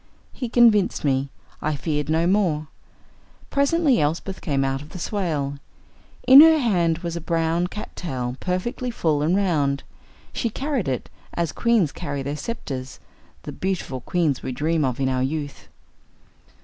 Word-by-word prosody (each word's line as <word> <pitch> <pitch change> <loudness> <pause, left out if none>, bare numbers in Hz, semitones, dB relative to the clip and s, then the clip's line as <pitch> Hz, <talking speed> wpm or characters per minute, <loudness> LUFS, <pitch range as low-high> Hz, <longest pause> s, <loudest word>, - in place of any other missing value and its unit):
He 250 -3 -4
convinced 225 -5 +4
me. 135 0 +1 0.3
I 155 0 -1
feared 150 +1 -2
no 160 +1 +2
more. 175 -6 +1 0.8
Presently 280 - +3
Elsbeth 165 +6 -2
came 140 -3 0
out 135 0 -1
of 150 - -11
the - - -9
swale. 155 -7 -2 0.7
In 265 +3 +11
her 320 0 +8
hand 175 - +1
was 170 0 -3
a 170 - -4
brown 165 +1 0
"cattail," 130 -11 -5
perfectly 190 +7 -2
full 160 -10 0
and 160 +5 +2
round. 150 -8 +1 0.5
She 230 - -1
carried 265 - -2
it 130 -2 -2 0.3
as 170 -2 -1
queens 225 - +2
carry 140 -1 -4
their 140 +2 -3
sceptres 135 - -6 0.4
the - - -6
beautiful 180 -9 -3
queens 160 -5 0
we - - -4
dream 155 +5 0
of 130 -2 -1
in 135 - +1
our 130 -1 0
youth. 145 +1 -4
165 Hz, 150 wpm, -23 LUFS, 140-200 Hz, 0.8 s, In